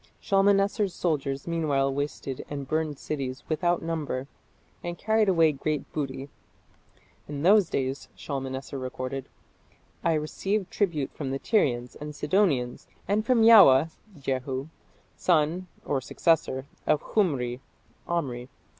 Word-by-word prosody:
Shalmaneser's 195 0 +2
soldiers 140 -5 -1
meanwhile 145 -5 +1
wasted 140 -2 -4
and 140 -2 -5
burned 155 -1 -1
cities 135 -3 -4
without 175 +2 +1
number, 155 -5 -2 0.6
and 175 0 -4
carried 220 -1 +2
away 165 -4 +5
great 150 +1 -3
booty. 135 -2 -3 1.0
"In 145 0 -4
those 195 0 +5
days", 135 0 -2
Shalmaneser 135 0 -5
recorded, 130 +1 -5 0.7
"I 165 - +3
received 190 +6 -2
tribute 165 -9 0
from 140 -3 -4
the 135 - -1
Tyrians 125 - +1
and 150 0 -7
Sidonians 150 -7 +1 0.2
and 205 +3 +2
from 230 -1 +3
Yaua 165 -10 +8 0.3
(Jehu) 135 +1 -3 0.5
son 170 +2 +2 0.3
(successor) 135 -3 +1 0.2
of 150 -1 +2
Khumri 130 - 0 0.5
(Omri)." 130 -8 -2
150 Hz, 115 wpm, -27 LUFS, 135-175 Hz, 1.0 s, Yaua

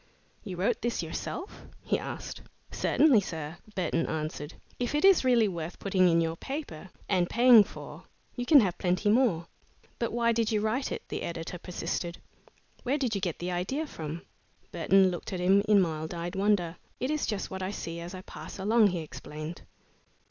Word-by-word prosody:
"You 190 -4 -6
wrote 215 +6 0
this 240 -6 -1
yourself?" 265 - -6 0.2
he - - 0
asked. - - -6 0.3
"Certainly, 275 -9 +4
sir," 160 -3 -6 0.2
Burton 175 -3 0
answered. 155 -1 -4 0.2
"If 245 +3 -1
it 300 - +3
is 390 -6 +6
really 240 -4 +4
worth 170 -2 -5
putting 190 -2 +3
in 165 0 +4
your 165 0 -1
paper 195 - -6 0.2
and 180 -3 +2
paying 240 -2 +7
for, 210 - -10 0.3
you 245 -1 -4
can 290 -4 +8
have 185 -5 -1
plenty 185 +3 +2
more." 215 -9 +3 0.5
"But 235 - -1
why 235 0 +2
did 230 -1 +1
you 215 - +2
write 220 +6 -1
it?" - - -4
the - - -3
editor 170 +1 -5
persisted. 175 -1 -4 0.6
"Where 265 +3 0
did 255 -6 -1
you 200 - -1
get 175 -4 -2
the 180 +1 -3
idea 190 - -2
from?" 160 - -6 0.5
Burton 190 -1 +4
looked 175 +3 -6
at 185 - -2
him 190 +3 +4
in 210 -1 +6
mild 160 -2 -1
eyed 170 +1 -4
wonder. 190 -4 +1 0.2
"It 255 +4 -1
is 305 -1 -1
just 210 -3 -3
what 190 0 -5
I 185 - -2
see 170 -4 -5
as 175 +2 -7
I 185 - -7
pass - - -9
along," 215 +3 +4
he 180 -3 -2
explained. 155 +1 -8
190 Hz, 185 wpm, -29 LUFS, 170-235 Hz, 0.6 s, can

